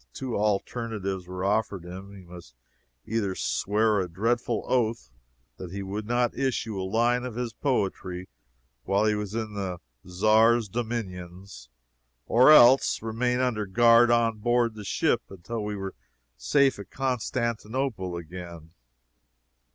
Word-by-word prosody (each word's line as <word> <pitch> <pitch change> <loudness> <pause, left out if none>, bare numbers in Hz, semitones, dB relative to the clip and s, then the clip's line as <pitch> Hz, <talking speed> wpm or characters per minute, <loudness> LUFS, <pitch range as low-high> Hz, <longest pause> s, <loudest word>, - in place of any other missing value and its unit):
Two 130 -3 -4
alternatives 100 -2 -2
were 90 +1 -4
offered 100 -3 0
him 95 +3 -9
he 100 -2 -12
must 85 -8 -13 0.5
either 100 -4 -1
swear 105 +2 +1
a 90 -2 -2
dreadful 115 +6 -1
oath 115 - 0 0.5
that 90 - -7
he 100 +1 -5
would 105 +2 -5
not 120 0 +1
issue 115 -6 -2
a 95 - -4
line 120 +3 +2
of 125 -3 -6
his 120 -1 -3
poetry 95 -8 -2 0.6
while 100 +5 +1
he 105 - +3
was 105 0 -4
in 110 -2 -3
the 95 -3 -4 0.3
Czar's 110 +5 +3
dominions, 95 - -6 0.6
or 125 +6 +6
else 130 -5 +6
remain 125 +3 0
under 110 -5 -1
guard 115 +3 +5
on 115 -2 +2
board 120 +1 +1
the 105 -1 -9
ship - - +1
until 100 +4 -6
we 105 0 -3
were 95 -1 -5 0.4
safe 130 - +2
at 100 - -9
Constantinople 120 -4 -2
again. 85 -1 -9
105 Hz, 135 wpm, -26 LUFS, 95-120 Hz, 0.6 s, or